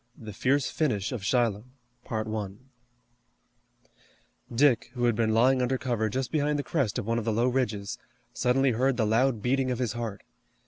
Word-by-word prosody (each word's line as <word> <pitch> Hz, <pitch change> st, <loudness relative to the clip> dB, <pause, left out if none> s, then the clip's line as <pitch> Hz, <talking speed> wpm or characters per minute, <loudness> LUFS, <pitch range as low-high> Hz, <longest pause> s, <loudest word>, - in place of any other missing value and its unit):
THE 110 Hz, -3 st, -9 dB
FIERCE 130 Hz, +6 st, +1 dB
FINISH 110 Hz, -10 st, -1 dB
OF 120 Hz, -6 st, -4 dB
SHILOH 110 Hz, -2 st, +1 dB, 2.9 s
Dick, 120 Hz, -1 st, +3 dB
who 120 Hz, -, -2 dB
had 120 Hz, -2 st, +2 dB
been 110 Hz, 0 st, +1 dB
lying 125 Hz, +4 st, +4 dB
under 130 Hz, +1 st, +1 dB
cover 115 Hz, -4 st, -1 dB
just 130 Hz, +3 st, -3 dB
behind 150 Hz, -1 st, +1 dB
the 145 Hz, -, -2 dB
crest 135 Hz, -11 st, -1 dB
of -, -, -3 dB
one 115 Hz, +1 st, 0 dB
of 110 Hz, -, -5 dB
the 115 Hz, -, +1 dB
low 115 Hz, +3 st, +2 dB
ridges, 120 Hz, -3 st, -1 dB, 0.3 s
suddenly 130 Hz, +1 st, +2 dB
heard 125 Hz, +2 st, +1 dB
the 110 Hz, -, +2 dB
loud 115 Hz, +1 st, +2 dB
beating 130 Hz, +1 st, +1 dB
of 125 Hz, -, -1 dB
his 120 Hz, -2 st, -1 dB
heart. 115 Hz, -4 st, -5 dB
120 Hz, 170 wpm, -27 LUFS, 110-130 Hz, 2.9 s, lying